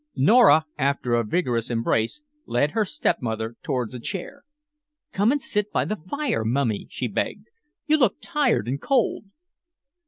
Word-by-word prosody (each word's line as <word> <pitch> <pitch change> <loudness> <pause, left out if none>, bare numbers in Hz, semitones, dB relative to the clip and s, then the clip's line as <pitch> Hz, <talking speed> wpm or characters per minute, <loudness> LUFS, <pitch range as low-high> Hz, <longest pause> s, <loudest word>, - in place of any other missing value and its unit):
Nora, 160 - +6
after 135 -3 0
a 120 0 +3
vigorous 120 -2 -1
embrace, 115 - 0 0.3
led 145 +5 +1
her 220 -2 +1
stepmother 115 - -2
towards 125 -4 -2
a 125 - -6
chair. 210 - -6 0.7
"Come 205 +5 +3
and 290 - +1
sit 210 -5 -1
by - - +1
the 215 -6 -4
fire, 285 - -1
Mummy," 115 -2 -1
she - - -3
begged. - - -3 0.4
"You 310 0 +4
look 245 -9 +3
tired 290 - 0
and 135 +3 -2
cold." 255 -5 +1
140 Hz, 150 wpm, -24 LUFS, -, 0.7 s, Nora